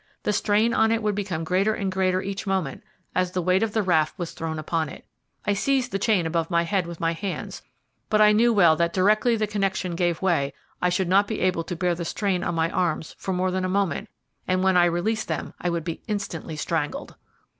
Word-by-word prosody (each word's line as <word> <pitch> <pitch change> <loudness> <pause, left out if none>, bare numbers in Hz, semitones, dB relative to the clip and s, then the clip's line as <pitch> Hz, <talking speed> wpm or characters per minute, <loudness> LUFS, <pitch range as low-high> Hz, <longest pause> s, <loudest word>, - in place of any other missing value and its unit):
The 210 - +1
strain 215 +3 +2
on 220 0 +3
it 225 -1 0
would 210 -1 +1
become 190 -5 -3
greater 190 +6 +1
and 195 -2 -2
greater 185 0 +1
each 195 +1 -5
moment 185 -8 -1 0.3
as 185 0 0
the 185 - 0
weight 185 +2 +3
of 225 -2 0
the 220 - +1
raft 160 -3 +2
was 175 -3 -4
thrown 160 -1 -4
upon 155 0 -1
it. - - -11 0.4
I 205 - +2
seized 250 +4 0
the 195 - -1
chain 205 -5 +2
above 165 0 -1
my 170 -1 +2
head 180 0 0
with 170 -1 -8
my 165 0 +1
hands, 190 +3 -5 0.5
but 215 - +3
I 210 0 +7
knew 230 +3 +4
well 175 -7 +5
that 170 0 +1
directly 215 +5 +3
the 215 -1 0
connection 195 -3 -1
gave 175 -1 0
way 165 -7 +1 0.3
I 180 - +3
should 185 +1 0
not 200 +3 +4
be 220 - -3
able 180 -2 +1
to 175 - -4
bear 180 +1 +1
the 170 0 -4
strain 185 +1 -1
on 170 - -1
my 165 +1 +1
arms 170 -3 -1
for 190 - -3
more 185 0 0
than 185 0 -1
a 185 - -1
moment, 195 -5 -1 0.4
and 185 0 +1
when 190 -1 +3
I 175 -1 +6
released 180 +6 0
them - - -4
I - - -1
should 170 -1 -2
be 165 -1 -5
instantly 200 -7 -4
strangled. 150 -1 -3
185 Hz, 230 wpm, -25 LUFS, 170-205 Hz, 0.5 s, I